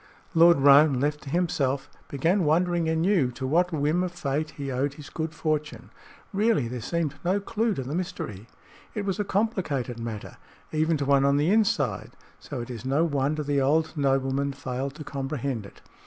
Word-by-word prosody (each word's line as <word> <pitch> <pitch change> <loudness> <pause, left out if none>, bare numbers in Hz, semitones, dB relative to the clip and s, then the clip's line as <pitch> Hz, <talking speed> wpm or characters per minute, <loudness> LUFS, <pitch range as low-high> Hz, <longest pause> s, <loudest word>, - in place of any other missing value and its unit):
Lord 170 -2 +6
Roane, 140 -1 +6
left 150 +2 0
to 140 - -9
himself, 140 -5 0 0.2
began 170 +8 +1
wondering 170 +1 +2
anew 160 -3 +2
to 130 +2 -5
what 175 +6 +2
whim 155 +2 +1
of 180 -1 -1
fate 150 -2 -2
he 140 -2 -6
owed 135 +2 -1
his 145 -1 -11
good 160 -1 -3
fortune. 150 -7 -3 0.4
Really, 210 - +2
there 120 0 -5
seemed 165 +3 -1
no 185 +3 +1
clue 220 +1 -1
to 135 - -3
the 135 +4 -5
mystery. 115 - -4 0.5
It 210 -2 -2
was 195 +1 -2
a - - +2
complicated 185 - -1
matter, 115 -2 -6 0.3
even 155 +1 +1
to 140 - -2
one 140 0 +4
on 140 0 +3
the 150 +5 +2
inside, 150 - +1 0.3
so - - -6
it 120 +2 -7
is 115 -2 -7
no 140 +5 +2
wonder 145 0 0
the 140 -1 +1
old 155 +4 +1
nobleman 135 0 +1
failed 135 0 -4
to 155 - -8
comprehend 135 -5 -3
it. - - -19
145 Hz, 185 wpm, -26 LUFS, 135-170 Hz, 0.5 s, Lord